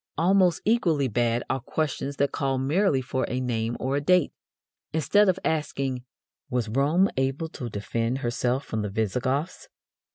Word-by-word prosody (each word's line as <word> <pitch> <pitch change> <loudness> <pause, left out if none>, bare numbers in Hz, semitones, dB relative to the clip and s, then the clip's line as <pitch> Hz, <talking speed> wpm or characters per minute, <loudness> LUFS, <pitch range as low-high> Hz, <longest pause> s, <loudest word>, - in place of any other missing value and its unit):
Almost 180 0 +3
equally 170 - +2
bad 120 +1 0
are 135 - -1
questions 140 +1 -3
that 140 0 +1
call 135 -1 -1
merely 140 +1 +1
for 130 +1 -2
a 125 - -1
name 120 -2 -2
or 135 +2 -1
a 145 - 0
date. 180 +1 +3 0.6
Instead 200 +6 +3
of 185 - +2
asking: 135 -5 -1 0.5
"Was 125 -4 -1
Rome 145 - +3
able 135 +5 -1
to 125 -5 -6
defend 115 +4 -2
herself 125 +1 -1
from 110 - -3
the 105 - -2
Visigoths?" 125 - -2
135 Hz, 155 wpm, -26 LUFS, 120-160 Hz, 0.6 s, Almost